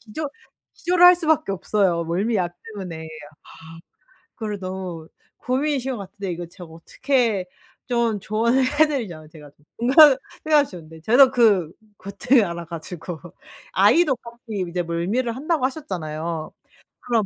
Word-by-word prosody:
기절 260 +7 -5 0.5
기절을 355 +1 +2
할 360 0 +10
수밖에 315 - +1
없어요 190 -3 0
멀미약 180 +1 -1 0.2
때문에. 175 -5 -7 0.4
아 165 0 -14 0.6
그거를 210 -3 -5
너무 185 -3 -6 0.3
고민이신 265 0 -1
것 - - -5
같은데 195 -1 -6
이거 175 +1 -5
제가 175 +1 -12
어떻게 220 - -1 0.4
좀 235 -4 0
조언을 230 +6 +1 0.2
해 310 - +7
드리자면 185 - -5
제가 150 -2 -14 0.3
공감을 265 +4 +7 0.3
해야 300 -2 +6
쉬운데 160 - -12
저는 255 - +6
그 205 -10 +3 0.3
고통을 230 +5 +2
알아 170 -1 -5
가지고 170 0 -7 0.5
아이도 265 - +4
같이 235 -5 -6
이제 175 +1 -2
멀미를 195 +9 -2
한다고 300 0 0
하셨잖아요. 165 - -4 0.5
그럼 230 -4 0
205 Hz, 310 characters per minute, -22 LUFS, 170-255 Hz, 0.6 s, 할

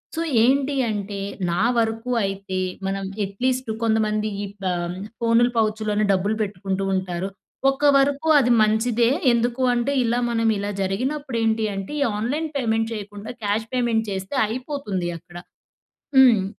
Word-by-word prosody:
So, 330 - -1 0.2
ఏంటి 275 +3 +2
అంటే, 205 -1 -3 0.3
నా 175 - 0 0.2
వరకు 225 +1 0
అయితే, 195 -1 -3 0.3
మనం 195 0 -2 0.2
అట్లీస్ట్టు 250 +5 -1
కొంతమంది 215 -1 +1
ఈ - - -2 0.2
ప 190 - -5
ఆహ్, 175 +1 -3 0.2
ఫోనులు 235 +1 +3
పౌచ్‌ 220 -1 +1
లోనే 210 0 +1
డబ్బులు 200 +3 0
పెట్టుకుంటూ 195 -1 -3
ఉంటారు, 185 0 -2 0.4
ఒక్క 270 +2 -7
వరకు 285 +3 +1
అది 245 -3 +2
మంచిదే. 225 +2 +2 0.2
ఎందుకు 240 +2 0
అంటే, 240 +3 0
ఇలా 235 +1 +1
మనం 230 -1 +1
ఇలా 200 +1 -3
జరిగినప్పుడు 255 +7 -2
ఏంటి 220 0 +1
అంటే, 195 +4 -5
ఈ - - +5 0.2
ఆన్లైన్ 290 +9 -1
పేమెంట్ 225 -3 0
చేయకుండా 205 0 -7
క్యాష్ 210 +2 0
పేమెంట్ 235 -3 +1
చేస్తే 190 +5 -4
అయిపోతుంది 225 - -3
అక్కడ. 175 +1 -18 0.8
హ్మ్. 240 -7 +6
220 Hz, 145 wpm, -23 LUFS, 195-245 Hz, 0.8 s, హ్మ్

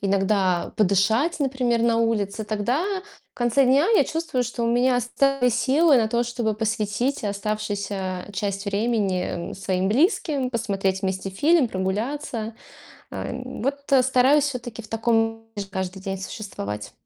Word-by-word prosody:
иногда 195 -2 +1
подышать, 220 - +2
например, 255 -4 +1
на 230 -1 +3
улице, 220 -2 0
тогда 215 - 0 0.5
в - - -67
конце 240 +3 +2
дня 275 +6 +4
я - - +6
чувствую, 320 -6 -2
что 240 0 -3
у - - +1
меня 245 +2 +3
остались 250 0 +1
силы 275 +5 +4
на 220 -2 +2
то, 235 +2 +1
чтобы 235 -2 -1
посвятить 220 +4 -1
оставшуюся 200 -2 -3
часть 200 0 -3
времени, 200 -3 0 0.3
м, - - -6
своим 190 -1 -1
близким, 280 - +1
посмотреть 195 -5 -1
вместе 190 0 -2
фильм, 285 - +3
прогуляться. 220 +4 -3 0.6
А - - -5
н 250 -1 -6
вот 280 +3 -1 0.2
стараюсь 260 +3 +4
все-таки 245 -5 -4
в 220 - -14
таком 225 0 0
режиме 200 -1 -4
каждый 190 0 -4
день 195 0 -4
существовать. 105 - -6
225 Hz, 145 wpm, -24 LUFS, 200-250 Hz, 0.6 s, я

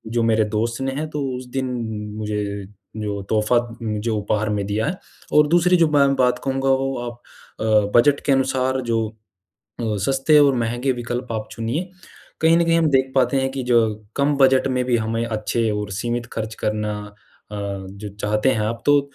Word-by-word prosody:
जो 115 - +2
मेरे 110 -1 +3
दोस्त 115 +3 -1
ने 135 - -1
है, 155 +3 -3
तो 150 -1 -4 0.2
उस 125 - -8
दिन 130 0 -1 0.5
मुझे 105 -1 -2 0.5
जो 105 -2 -3
तोहफ़ा 110 +2 +2 0.4
जो 110 -1 -1
उपहार 105 +1 -1
में 105 -1 -1
दिया 105 +3 -1
है। 185 - -2 0.4
और 150 0 +6
दूसरी 175 +2 +4
जो 165 -2 +4
मैं 140 -2 +4
बात 125 -1 +2
कहूँगा 135 0 0
वो 135 0 +1
आप 120 0 -14 0.4
अ, 105 -2 +2
बजट 140 +3 +4
के 140 - +2
अनुसार 130 -1 +1
जो 115 -2 0 0.7
अ, 110 -2 -1
सस्ते 135 +3 +4
और 140 -2 +5
महँगे 120 +3 0
विकल्प 120 0 -4
आप 110 -1 -4
चुनिए। 135 +12 -3 0.5
कहीं 165 +1 +5
न 170 - +3
कहीं 165 0 +3
हम 165 - +3
देख 130 -1 +2
पाते 130 0 +3
हैं 135 0 0
कि 135 -1 -4
जो 120 -1 +3 0.4
कम 145 +1 +2
बजट 135 -1 +4
में 125 -1 0
भी 125 -1 +2
हमें 115 +1 -1
अच्छे 110 0 -1
और 105 -1 -3
सीमित 120 +3 -2
खर्च 110 0 -4
करना। 105 0 -1
अ, 105 - -14 0.4
जो 100 0 -6
चाहते 105 +4 +1
हैं 110 - 0
आप, 110 +2 -2
तो 145 0 +6
120 Hz, 190 wpm, -22 LUFS, 110-135 Hz, 0.7 s, और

